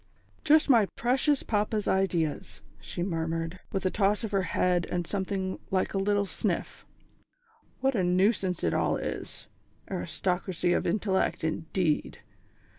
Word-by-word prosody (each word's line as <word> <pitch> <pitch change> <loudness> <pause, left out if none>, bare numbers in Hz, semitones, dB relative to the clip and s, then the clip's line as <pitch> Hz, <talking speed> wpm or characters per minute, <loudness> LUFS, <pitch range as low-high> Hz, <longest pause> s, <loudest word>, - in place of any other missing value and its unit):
"_ - - -37
"Just 310 +1 +5
my 230 -7 +5
precious 265 +4 +2
papa's 210 0 0
ideas!" 175 -5 0 0.2
she 80 - -5
murmured, 165 0 -2
with 190 -1 -2
a 185 - +2
toss 205 +2 +1
of 220 - -3
her 195 -1 +2 0.2
head, 180 -1 +2
and 175 -1 -1
something 190 0 -2
like 185 -1 0
a 195 - 0
little 205 +1 +2
sniff. - - -3 0.9
"What 270 +1 +2
a 200 -6 +1
nuisance 185 0 +2
it 80 - +1
all - - +1
is! - - -5 0.5
Aristocracy 180 - -1
of - - 0
intellect, 190 -1 0
indeed! 160 0 -1
190 Hz, 140 wpm, -28 LUFS, 175-205 Hz, 0.9 s, Just